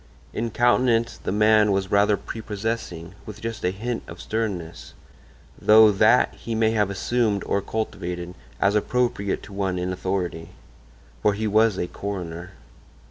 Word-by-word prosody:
In 115 +1 -2
countenance 120 0 +2
the - - -3
man 105 0 +4
was 95 0 -1
rather 100 0 +4
prepossessing, 105 -5 -5
with 105 -1 -8
just 115 0 -5
a 90 - +2
hint 115 +5 -4
of - - -10
sternness; 100 -7 -4 0.7
though 110 0 +7
that 110 +5 +4
he 115 - -5
may 110 0 +2
have 105 -3 +1
assumed 105 +1 0
or 100 - 0
cultivated, 90 -5 -4 0.3
as 100 - +3
appropriate 105 -2 0
to 105 - -11
one 95 -2 -1
in 90 +1 -2
authority. 90 -3 -3 0.7
For 105 -1 +2
he 110 +2 -2
was 110 -1 +3
a - - -1
coroner. 90 -2 -6
105 Hz, 145 wpm, -24 LUFS, 95-110 Hz, 0.7 s, though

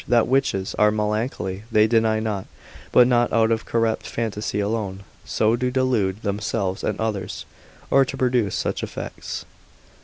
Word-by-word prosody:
That 120 -2 +4
witches 120 -7 +1
are 105 - +6
melancholy, 105 -2 -2
they 105 -1 +5
deny 110 -1 +2
not, 105 -3 -3 0.4
but 125 - +7
not 120 -1 +2
out 115 0 +3
of 115 0 0
corrupt 115 -1 0
phantasy 110 -2 -2
alone, 100 -2 -2 0.2
so 110 +1 +2
to 125 +1 0
delude 120 -6 0
themselves 100 -1 -2
and - - -1
others, 105 -4 -3 0.5
or 135 - +6
to - - -6
produce 125 -6 +1
such - - -2
effects. - - -6
110 Hz, 150 wpm, -23 LUFS, 105-120 Hz, 0.5 s, but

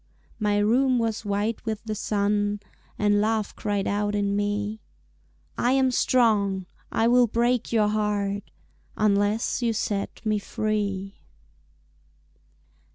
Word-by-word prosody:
My 210 -1 +1
room 250 +5 +3
was 225 -1 -1
white 205 +2 -1
with 220 -2 -4
the 220 -1 -3
sun 205 0 0 0.4
And 205 0 +3
Love 220 -1 0
cried 205 -2 -1
out 205 0 0
in 200 -1 0
me, 205 +1 -2 0.8
"I 245 +2 +3
am 265 -1 +3
strong, 210 -7 +2 0.3
I 225 - +2
will 245 0 +5
break 240 +2 0
your 215 -2 +3
heart 205 -1 -1 0.5
Unless 210 +3 +1
you 235 -1 +1
set 205 +1 -3
me 215 -1 +1
free." 200 -2 -2
210 Hz, 120 wpm, -25 LUFS, 205-225 Hz, 0.8 s, will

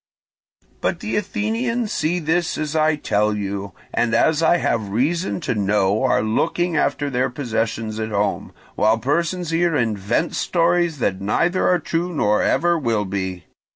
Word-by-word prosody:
"But - - -1
the 220 -2 -3
Athenians 220 +3 -1
see 165 +3 0
this 165 +1 0
as 155 0 -3
I 155 0 +3
tell 105 -7 0
you, 100 -1 -4 0.2
and 120 -2 +1
as 160 0 +3
I 170 +1 +4
have 110 -10 -1
reason 155 - 0
to 130 - -1
know 105 0 +1
are - - +2
looking 170 +10 0
after 145 -2 0
their 130 +1 +1
possessions 115 -3 -3
at 110 0 -2
home, 105 -1 -1 0.2
while 110 +1 +3
persons 170 - -1
here 165 0 +2
invent 115 - 0
stories 170 -2 +1
that 95 -7 -1
neither 170 - +1
are 180 - +4
true 170 +2 -2
nor 105 -6 +2
ever 170 0 +2
will 115 -6 0
be. 95 -2 -4
145 Hz, 155 wpm, -21 LUFS, 105-170 Hz, 0.2 s, I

